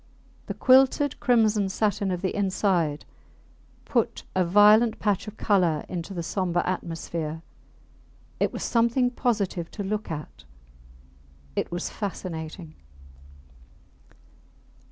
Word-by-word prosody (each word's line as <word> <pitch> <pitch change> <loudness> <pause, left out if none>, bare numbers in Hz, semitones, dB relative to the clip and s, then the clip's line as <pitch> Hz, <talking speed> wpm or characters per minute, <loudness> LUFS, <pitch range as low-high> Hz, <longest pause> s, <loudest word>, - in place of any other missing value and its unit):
The - - -4
quilted 265 +2 +4
crimson 215 -5 +3
satin 205 0 0
of 180 0 -3
the 190 - -1
inside 185 -6 0 0.8
put - - -1
a 185 - +2
violent 210 +5 +5
patch 205 -1 -1
of 210 +1 -8
colour 180 -7 +1
into 180 +2 -5
the 170 - -3
sombre 175 -1 -1
atmosphere; 165 -3 -4 1.0
it - - +1
was - - -5
something 235 +2 +2
positive 205 -9 -1
to 205 - -6
look 210 +2 -3
at 150 -2 -7 1.1
it - - -2
was 175 0 -3
fascinating. 160 - -6
195 Hz, 110 wpm, -26 LUFS, 170-215 Hz, 1.1 s, violent